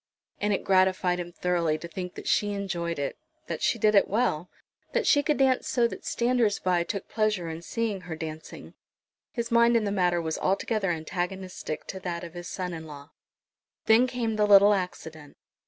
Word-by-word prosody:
And 210 0 0
it 200 - 0
gratified 185 -1 +2
him 175 0 -5
thoroughly 170 -3 0
to 170 - -8
think 180 +1 -6
that - - -8
she 205 -1 +2
enjoyed 175 -4 -3
it, 140 -1 -3 0.3
that - - -5
she - - +2
did 215 -1 +3
it 200 - +5
well, 190 -6 0 0.4
that - - +1
she 290 - +5
could 295 +1 0
dance 265 -2 +2
so 240 -2 +2
that - - -9
standers 235 -3 +1
by 180 -2 +1
took 200 +2 -5
pleasure 215 -6 0
in 160 +1 -6
seeing 215 +1 -2
her 170 -2 -6
dancing. 160 0 -8 0.6
His 235 -1 -4
mind 235 0 +5
in 225 - 0
the 205 - -1
matter 180 -3 +2
was 160 -1 -3
altogether 195 +1 0
antagonistic 175 0 -4
to 190 - -6
that 175 -2 -4
of 170 -1 -8
his 175 0 -7
son 180 -2 -4
in 160 -1 -7
law. 145 0 -11 0.7
Then 225 +3 +5
came 235 -3 -2
the 210 0 +3
little 200 0 +7
accident. 160 -5 -5
185 Hz, 190 wpm, -27 LUFS, 170-215 Hz, 0.7 s, little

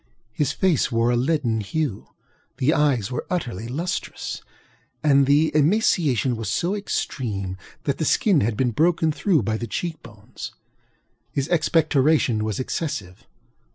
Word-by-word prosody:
His 145 +4 0
face 155 -3 +1
wore 115 +1 +2
a - - +2
leaden 125 -3 +1
hue; 125 +1 -3 0.5
the 140 +3 +2
eyes 135 -8 +1
were 125 - -4
utterly 120 - -3
lustreless; 165 +9 -4 0.6
and 140 -2 +4
the 150 +2 +3
emaciation 150 - +2
was 110 -3 -4
so 175 - 0
extreme 110 - -3 0.3
that 140 - -1
the 160 - 0
skin 185 -4 +3
had 105 0 0
been 125 -1 +1
broken 160 +5 +2
through 160 - +1
by 110 +1 -1
the 120 - -5
cheek 160 - -4
bones. 110 -3 -10 0.8
His 140 0 -1
expectoration 155 -7 +2
was 110 +1 -2
excessive. 130 - -4
140 Hz, 140 wpm, -23 LUFS, 115-160 Hz, 0.8 s, and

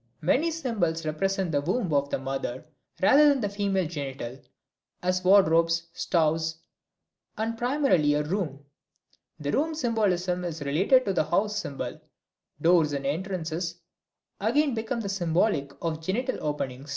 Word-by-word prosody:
Many 265 - +2
symbols 205 - -1
represent 190 +3 -1
the 145 -2 +1
womb 180 +2 -1
of 140 0 +2
the - - 0
mother 135 0 -4 0.4
rather 290 +8 +7
than 280 -1 +2
the 205 -4 -1
female 200 -2 0
genital, 135 -5 -6 0.6
as 185 0 0
wardrobes, 165 -3 +4
stoves, 160 -1 0 0.8
and 225 +1 -1
primarily 230 - +2
a 150 - +1
room. 150 -4 -3 0.7
The 145 -1 -2
room 315 +3 0
symbolism 190 - 0
is 165 -3 -4
related 190 - +3
to 195 - 0
the 160 -4 +1
house 200 +7 +1
symbol, 145 -7 -4 0.6
doors 165 -2 +4
and 140 -1 -3
entrances 170 +1 -2 0.6
again 295 -2 +2
become 225 -1 -3
symbolic 175 -5 0
of 165 -2 -1
the - - -18
genital 235 +10 -1
opening. 135 -2 -4
175 Hz, 140 wpm, -27 LUFS, 150-210 Hz, 0.8 s, rather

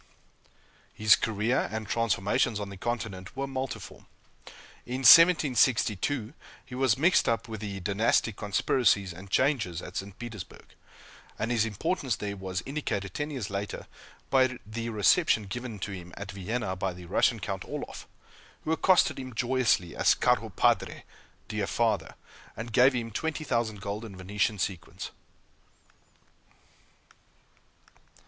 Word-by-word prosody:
His 110 0 +6
career 110 +3 0
and 110 -1 -4
transformations 105 0 +1
on 100 -1 -5
the 100 - -8
Continent 110 -2 -4
were 135 - -1
multiform. 135 -1 -6 0.8
In 125 +2 -3
1762, 130 - +5 0.3
he - - -12
was 130 -3 +2
mixed 170 +7 +4
up 115 0 0
with 110 -2 -7
the 100 -2 -5
dynastic 105 +3 +1
conspiracies 100 -1 +1
and 95 +3 -11
changes 115 - +1
at - - -9
St. 100 0 -6
Petersburg; 110 -6 -9 0.7
and 115 +3 -2
his 115 -2 +2
importance 120 - -1
there 100 -1 -4
was 95 -2 -4
indicated 115 -9 -3
ten 150 +1 -3
years 125 -9 -5
later, 100 0 -4 0.5
by 130 -2 +3
the 115 +2 -4
reception 110 - +3
given 115 +2 -6
to 100 +1 -5
him 90 -2 -8
at 100 0 -6
Vienna 100 +1 -3
by 95 0 -2
the 90 0 -11
Russian - - +2
Count - - -4
Orloff, - - -6 0.6
who 155 - -2
accosted 175 -1 +3
him 130 -3 -7
joyously 120 -8 +1
as - - +4
"caro - - +1
padre" - - +1 0.4
(dear - - -2
father,) - - 0 0.4
and 115 +1 -6
gave 130 +3 +6
him 115 -2 -3
twenty 160 +7 -3
thousand 115 -7 -1
golden 105 +1 -5
Venetian 100 +3 -1
sequins. 90 -3 -4
110 Hz, 135 wpm, -28 LUFS, 100-130 Hz, 0.8 s, His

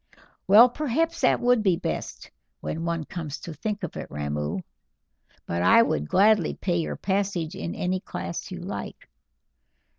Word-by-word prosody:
"Well, 215 +5 +9
perhaps 310 +5 -1
it - - +4
would 245 -1 +3
be 190 -4 +3
best, - - -5 0.3
when 165 +1 -4
one 170 -1 -1
comes 155 -3 -6
to 170 - -7
think 205 +6 -4
of 175 - -5
it, - - -6
Ramoo; 75 +3 -3 0.8
but 85 0 -2
I 90 +1 +6
would 75 +1 -1
gladly 205 -3 +4
pay 175 -3 -1
your 165 - -2
passage 190 -4 -1
in 185 -3 -5
any 185 +1 -1
class 170 - -6
you 180 -1 -7
like." 185 +3 -7
180 Hz, 155 wpm, -26 LUFS, 155-210 Hz, 0.8 s, Well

